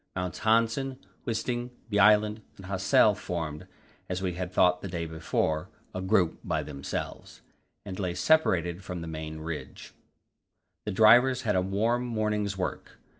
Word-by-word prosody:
Mounts 90 -1 -3
Hanssen, 115 +4 +2 0.3
Wisting, 120 +1 -2 0.2
Bjaaland, 105 +1 +4 0.2
and 95 - -11
Hassel 95 +2 +4
formed, 85 -7 -5 0.4
as 90 0 -2
we 95 -2 -2
had 90 +1 -4
thought 90 -1 +3
the - - -5
day 85 -2 -3
before, 80 -1 -1 0.2
a 95 - -4
group 95 -3 +2
by 80 -3 -1
themselves, 70 -2 -6 0.4
and 95 -1 -6
lay 90 -3 -2
separated 90 - +2
from 90 -2 -5
the 85 - -6
main 80 0 -6
range. 80 -1 -7 0.9
The - - -2
drivers 120 +6 +5
had 105 -3 +1
a 90 - +3
warm 110 +6 0
morning's 105 -3 -1
work. 95 - -4
95 Hz, 145 wpm, -28 LUFS, 85-110 Hz, 0.9 s, drivers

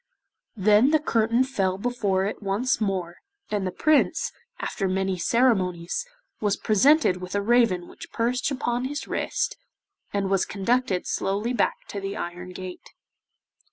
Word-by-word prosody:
Then 210 +6 +5
the 310 - +5
curtain 230 -3 +2
fell 195 -8 -1
before 200 -4 0
it 205 - -4
once 215 +5 0
more, 185 -4 -2 0.3
and 200 -3 0
the - - -2
Prince, 310 +9 +2 0.3
after 195 - -2
many 190 0 0
ceremonies, 195 - +1 0.3
was 205 -2 +1
presented 255 - +4
with 185 +1 -6
a 200 - +2
raven 225 -6 +3
which - - -12
perched 245 +3 0
upon 250 -2 -1
his 290 +2 -4
wrist, - - -2 0.5
and 200 -1 0
was 195 -1 +3
conducted 205 -1 0
slowly 205 +5 -1
back - - 0
to 200 - -5
the 195 0 -4
iron 175 +1 -5
gate. 185 0 -8
205 Hz, 145 wpm, -25 LUFS, 190-245 Hz, 0.5 s, Then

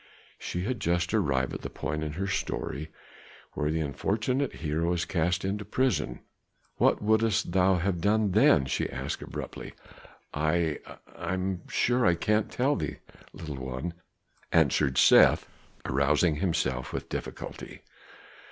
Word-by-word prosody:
She 90 - -3
had 125 +4 -2
just 85 +2 0
arrived 70 -11 +1
at - - -5
the - - -5
point 75 0 -3
in 75 -1 -4
her 95 +5 -2
story 80 -5 -3 0.6
where 75 - -1
the 80 +1 0
unfortunate 110 - -1
hero 80 +2 -1
is 85 -1 -1
cast 90 +2 0
into 100 +2 -2
prison. 130 +5 0 0.6
"What - - +3
wouldst 110 -2 +2
thou 95 +1 +4
have 90 0 -1
done 105 +1 +2
then?" 105 - +5
she - - -1
asked - - -4
abruptly. - - -7 0.6
"I 80 +1 0 0.4
I 95 - -3
am 95 -1 -2
sure 125 +1 +1
I 90 -4 +4
cannot 105 +5 +1
tell 135 +4 +1
thee, - - -3 0.3
little 75 -4 -7
one," 65 +7 -4 0.6
answered 70 -4 +3
Seth, - - +6 0.4
rousing 75 +4 +2
himself 80 -8 -1
with - - -4
difficulty. - - -7
90 Hz, 140 wpm, -28 LUFS, 75-105 Hz, 0.6 s, Seth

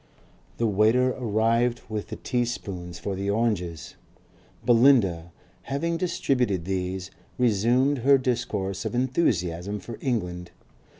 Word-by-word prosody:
The 115 - +1
waiter 110 +5 +3
arrived 115 +1 +1
with 110 -2 -4
the - - -6
tea 125 -2 -1
spoons 90 -7 -5
for 100 - -4
the 100 +1 -3
oranges. 100 -7 -1 0.7
Belinda, 115 -9 +4 0.4
having 165 +5 -1
distributed 125 - 0
these, 95 0 -3 0.3
resumed 125 +4 +2
her 135 +3 +5
discourse 115 -7 -2
of - - -3
enthusiasm 105 - 0
for 115 +3 -9
England. 90 -9 -2
110 Hz, 115 wpm, -26 LUFS, 95-125 Hz, 0.7 s, her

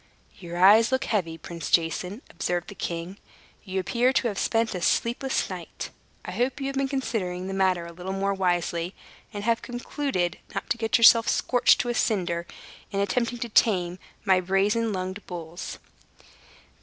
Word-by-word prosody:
"Your 175 -1 -7
eyes 210 +6 +6
look 260 - +1
heavy, 170 -7 -1
Prince 170 +1 -7
Jason," 180 - 0
observed 175 0 -2
the - - -7
king; 175 +1 -5 0.4
"you 190 -1 -3
appear 235 +7 +2
to 255 - +2
have 200 - -4
spent 225 0 +1
a 180 - -4
sleepless 240 +8 +1
night. - - -7 0.3
I - - -5
hope 255 +3 -1
you 270 - -3
have 275 0 -3
been 275 0 +1
considering 220 -10 -2
the 195 - -4
matter 185 -3 +1
a 170 - -8
little 180 +2 -6
more 195 +1 0
wisely, 175 -1 -1 0.4
and 205 -2 -5
have 230 +1 +1
concluded 240 - -2 0.2
not - - -4
to 235 - +2
get 225 +1 +2
yourself 230 0 +7
scorched 245 -1 +3
to 245 - -3
a - - +1
cinder, 175 -7 0 0.4
in 200 - -2
attempting 235 +5 0
to 235 0 -4
tame 185 -5 +2 0.3
my 190 -3 +5
brazen 200 +5 +1
lunged 185 +1 -4
bulls." 170 0 -6
195 Hz, 170 wpm, -26 LUFS, 180-230 Hz, 0.4 s, yourself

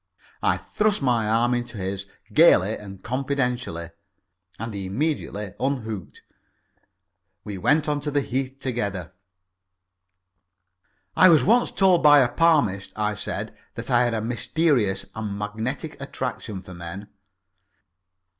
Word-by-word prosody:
I - - +2
thrust 210 -6 0
my 115 -4 +2
arm 120 +2 +2
into 120 -2 -3
his 95 0 -4 0.3
gaily - - +6
and 95 -2 -10
confidentially, 125 - -2 0.7
and 115 0 -5
he 100 -2 -4
immediately 105 - -2
unhooked. 115 -7 -3 1.2
We 100 -2 -6
went 150 - +2
on 150 -1 0
to 145 +1 -3
the 145 0 +1
Heath 135 0 -3
together. 100 - -3 2.0
"I 185 - +7
was 160 -3 +6
once 240 +4 +4
told 190 -3 +3
by 145 -1 +8
a 125 - +3
palmist," 140 - +2
I 105 -1 0
said, - - -5 0.2
"that - - -6
I 120 0 +4
had 120 -1 0
a 110 - -1
mysterious 115 - +1
and 105 -2 -4
magnetic 110 +10 -4
attraction 125 -7 -5
for 90 - -11
men." 90 +4 -8
120 Hz, 125 wpm, -24 LUFS, 100-140 Hz, 2.0 s, by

